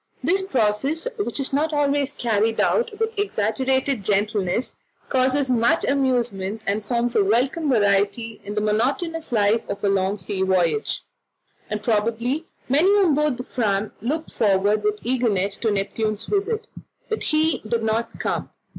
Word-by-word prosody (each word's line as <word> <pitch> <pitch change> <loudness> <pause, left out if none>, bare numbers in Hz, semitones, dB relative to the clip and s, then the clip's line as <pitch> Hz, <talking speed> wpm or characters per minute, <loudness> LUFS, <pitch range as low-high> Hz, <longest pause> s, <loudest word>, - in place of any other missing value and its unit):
This 380 +3 +2
process, 270 - 0
which 410 - -2
is 275 0 -3
not 305 +3 +1
always 285 -1 +1
carried 225 -3 0
out 475 -1 +2
with 450 0 -1
exaggerated 260 - 0
gentleness, 205 +2 0 0.3
causes 260 +1 +2
much 245 +7 +3
amusement, 235 -7 0
and 205 +2 -1
forms 240 +2 0
a - - +5
welcome 260 +9 +1
variety 210 0 +1
in 205 +1 -6
the 210 - 0
monotonous 275 +10 -1
life 220 0 +2
of 200 - -5
a 200 - +3
long 195 +1 +1
sea 190 +1 -4
voyage, 190 - +1 0.7
and 210 0 -3
probably 230 +8 0 0.2
many 300 +9 +4
on 400 -6 +4
board 300 -3 +1
the 250 - -5
Fram 215 -5 -1
looked 305 +8 -3
forward 205 0 +2
with 210 0 0
eagerness 220 -6 0
to 225 - 0
Neptune's 215 +2 -1
visit, 430 +2 -1 0.4
but 440 - -2
he 310 +1 +2
did 225 +1 -2
not 225 +1 -1
come. - - -2
235 Hz, 150 wpm, -23 LUFS, 210-285 Hz, 0.7 s, a